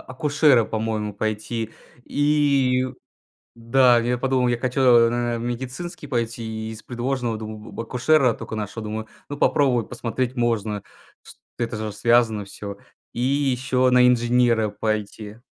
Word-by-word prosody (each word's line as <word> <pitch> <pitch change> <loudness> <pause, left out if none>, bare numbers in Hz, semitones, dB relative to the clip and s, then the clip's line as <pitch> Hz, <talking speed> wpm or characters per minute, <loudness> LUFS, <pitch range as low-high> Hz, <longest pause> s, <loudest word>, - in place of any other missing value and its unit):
акушера, 140 -2 +2
по-моему, 110 -1 -3
пойти. 110 +2 -3 0.3
И 140 -3 +2 0.7
Да, 120 +1 +4
я 120 +1 0
подумал: 130 -1 +1
"Я 120 -1 0
хочу 130 +2 -2
на 120 -1 +4
а - - -3
медицинский 130 +8 -5
пойти"- 120 -3 -2 0.3
и - - -5
из 110 - -10
предложенного, 120 -2 -3
думаю, 110 0 -9
акушера 125 +2 +2
только - - -7
нашел. 105 +1 -5
Думаю: 110 +1 -5 0.2
"Ну 145 - -5
попробовать 125 -7 +2
посмотреть 120 +1 -3
можно, 110 -4 -1 0.4
св - - -15 0.2
это 115 -2 -2
же 110 -1 -4
связано 115 -1 +2
всё". 100 0 -8 0.4
И - - -4
ещё 130 -1 +1
на 125 0 +6
инженера 120 -2 +3
пойти. 105 0 -4
120 Hz, 135 wpm, -23 LUFS, 110-130 Hz, 0.7 s, на